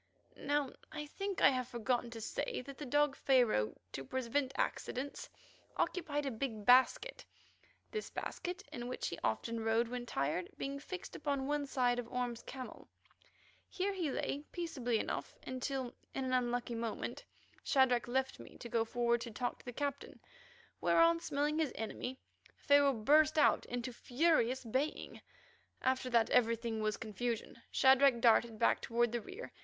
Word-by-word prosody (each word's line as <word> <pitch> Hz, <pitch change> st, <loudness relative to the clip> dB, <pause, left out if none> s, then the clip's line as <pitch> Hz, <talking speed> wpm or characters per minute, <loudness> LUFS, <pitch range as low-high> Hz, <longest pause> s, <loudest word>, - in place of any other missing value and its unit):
Now 285 Hz, -1 st, -1 dB, 0.2 s
I 300 Hz, -1 st, -5 dB
think 390 Hz, +6 st, -4 dB
I -, -, +8 dB
have 255 Hz, -2 st, -1 dB
forgotten 240 Hz, 0 st, -1 dB
to 230 Hz, -1 st, -8 dB
say 235 Hz, -, -3 dB
that 275 Hz, -1 st, -9 dB
the 295 Hz, -, -5 dB
dog 290 Hz, +1 st, +3 dB
Pharaoh, 240 Hz, -, +3 dB, 0.2 s
to 135 Hz, -, -5 dB
prevent 260 Hz, -, -1 dB
accidents, 270 Hz, +3 st, -2 dB, 0.5 s
occupied 295 Hz, -5 st, -1 dB
a 270 Hz, -, -1 dB
big 220 Hz, -3 st, -4 dB
basket; 260 Hz, -, +4 dB, 0.7 s
this 430 Hz, -1 st, -4 dB
basket, 365 Hz, +3 st, -5 dB
in 240 Hz, -1 st, -5 dB
which 255 Hz, -, -3 dB
he 170 Hz, -, -6 dB
often 230 Hz, -, -1 dB
rode 225 Hz, +1 st, +2 dB
when 245 Hz, 0 st, -5 dB
tired, 150 Hz, +4 st, -1 dB
being 275 Hz, +1 st, -3 dB
fixed 365 Hz, +5 st, -7 dB
upon 280 Hz, -2 st, -1 dB
one 290 Hz, 0 st, -1 dB
side 245 Hz, -2 st, +1 dB
of 235 Hz, -1 st, -6 dB
Orme's 245 Hz, -2 st, -2 dB
camel. 260 Hz, -1 st, -8 dB, 0.8 s
Here 395 Hz, +2 st, -1 dB
he 350 Hz, -6 st, -1 dB
lay 280 Hz, +2 st, -2 dB
peaceably 265 Hz, -10 st, -1 dB
enough -, -, -3 dB
until, 260 Hz, 0 st, -3 dB, 0.2 s
in 265 Hz, -, -1 dB
an 255 Hz, -, -1 dB
unlucky 245 Hz, -1 st, 0 dB
moment, 230 Hz, -1 st, -4 dB, 0.4 s
Shadrach 255 Hz, -4 st, +3 dB
left 260 Hz, +2 st, -1 dB
me -, -, -12 dB
to 235 Hz, -, -8 dB
go 230 Hz, 0 st, +2 dB
forward 235 Hz, 0 st, +1 dB
to 235 Hz, -, -5 dB
talk 245 Hz, +3 st, -3 dB
to -, -, -18 dB
the 245 Hz, -, -5 dB
Captain, 280 Hz, +2 st, -4 dB, 0.6 s
whereon, 335 Hz, 0 st, +5 dB
smelling 295 Hz, -1 st, 0 dB
his 310 Hz, -5 st, +1 dB
enemy, 250 Hz, +3 st, -4 dB, 0.4 s
Pharaoh 285 Hz, -1 st, +5 dB
burst 300 Hz, +7 st, +4 dB
out 300 Hz, -, +4 dB
into 245 Hz, +1 st, -4 dB
furious 260 Hz, -1 st, +2 dB
baying. 260 Hz, +7 st, -2 dB, 0.6 s
After 260 Hz, 0 st, +1 dB
that 235 Hz, -2 st, +3 dB
everything 230 Hz, -2 st, +2 dB
was 215 Hz, -1 st, 0 dB
confusion. 230 Hz, +1 st, -4 dB
Shadrach 265 Hz, -1 st, +5 dB
darted 230 Hz, -1 st, +4 dB
back 230 Hz, -, +3 dB
toward 235 Hz, 0 st, +1 dB
the 240 Hz, 0 st, -1 dB
rear. 480 Hz, -, -8 dB
255 Hz, 160 wpm, -35 LUFS, 235-285 Hz, 0.8 s, I